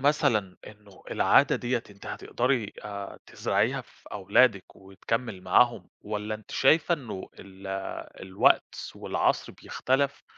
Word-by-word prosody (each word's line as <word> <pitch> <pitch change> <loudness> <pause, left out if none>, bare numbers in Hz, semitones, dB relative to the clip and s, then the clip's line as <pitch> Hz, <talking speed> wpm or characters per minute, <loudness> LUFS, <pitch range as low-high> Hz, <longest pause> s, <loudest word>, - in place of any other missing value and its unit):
مثلًا 110 -9 +2
إنه 105 -2 -15
العادة - - +4
دَيّة 120 -1 -1
أنتِ 100 0 -14
هتقدري 120 -4 -1
آآ 100 -1 -7
تزرعيها - - 0
في - - -21
أولادِك 100 +1 +2
وتكمّل 95 +2 -4
معاهم؟ 120 +6 +3
والّا 105 0 -3
أنتِ 110 -1 -12
شايفة 160 +5 +4
إنه 115 - -7
ال 95 0 -12 0.6
الوقت 95 0 +3 0.2
والعصر - - 0
بيختلف 135 +2 -1
105 Hz, 115 wpm, -27 LUFS, 100-125 Hz, 0.6 s, العادة